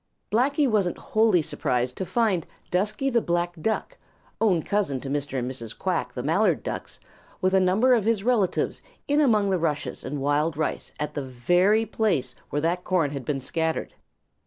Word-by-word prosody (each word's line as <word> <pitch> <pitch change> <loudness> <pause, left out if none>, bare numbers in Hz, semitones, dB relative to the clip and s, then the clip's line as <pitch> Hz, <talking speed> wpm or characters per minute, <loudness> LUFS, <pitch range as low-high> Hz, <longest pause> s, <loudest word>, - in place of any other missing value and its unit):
Blacky 280 +6 +3
wasn't 205 -7 +1
wholly 215 - +2
surprised 125 -3 -1
to 190 - -3
find 210 -8 +1 0.2
Dusky 215 +9 0
the 235 -1 +3
Black 175 -1 0
Duck, 220 +4 -2 0.4
own 185 -8 +3
cousin 195 -10 0
to 135 - -5
Mr. 145 -1 -2
and 125 -1 -1
Mrs. 115 -4 -8
Quack - - -1
the - - -3
Mallard - - +2
Ducks, - - -6 0.4
with 185 0 +1
a 190 - +6
number 195 +8 +4
of 225 -4 +2
his 220 -3 +1
relatives 225 -6 +1 0.3
in 290 +1 +3
among 215 -8 +3
the 185 - +1
rushes 155 -3 -2
and 145 +2 -4
wild 145 +3 +1
rice 155 - -2
at 150 - -3
the 145 - -2
very 175 - +2
place 210 - 0 0.2
where 145 - -1
that 175 +2 0
corn 170 -6 +1
had 140 -2 -5
been 140 0 -1
scattered. 160 +4 -2
180 Hz, 180 wpm, -25 LUFS, 145-215 Hz, 0.4 s, a